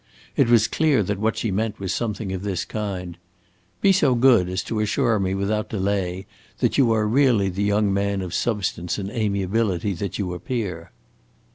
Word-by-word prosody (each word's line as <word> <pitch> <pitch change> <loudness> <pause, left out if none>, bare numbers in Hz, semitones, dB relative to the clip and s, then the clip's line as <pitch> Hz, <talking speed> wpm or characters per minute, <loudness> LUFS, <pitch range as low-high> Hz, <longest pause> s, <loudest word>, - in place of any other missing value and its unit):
It - - +3
was 115 -2 +5
clear 145 -3 +2
that 100 +1 -3
what 110 +1 0
she 110 - -1
meant 105 +2 -2
was 95 -2 -2
something 105 -4 -3
of 95 - -4
this 95 -2 -2
kind: 90 -5 -5 0.6
"Be 195 - +5
so 145 -9 +3
good 120 -7 +4
as 90 0 -2
to 110 - -3
assure 110 +1 +1
me 95 0 -1
without 105 +2 -1
delay 95 -2 -2 0.3
that - - +1
you 130 -5 +4
are 110 -1 +2
really 115 -5 +3
the 95 +2 -4
young 100 0 +2
man 100 -1 0
of 90 - -6
substance 100 -6 -1
and 100 -1 -4
amiability 100 -3 0
that 95 +1 -4
you 95 -3 -2
appear." 90 -3 -4
100 Hz, 180 wpm, -23 LUFS, 95-115 Hz, 0.6 s, was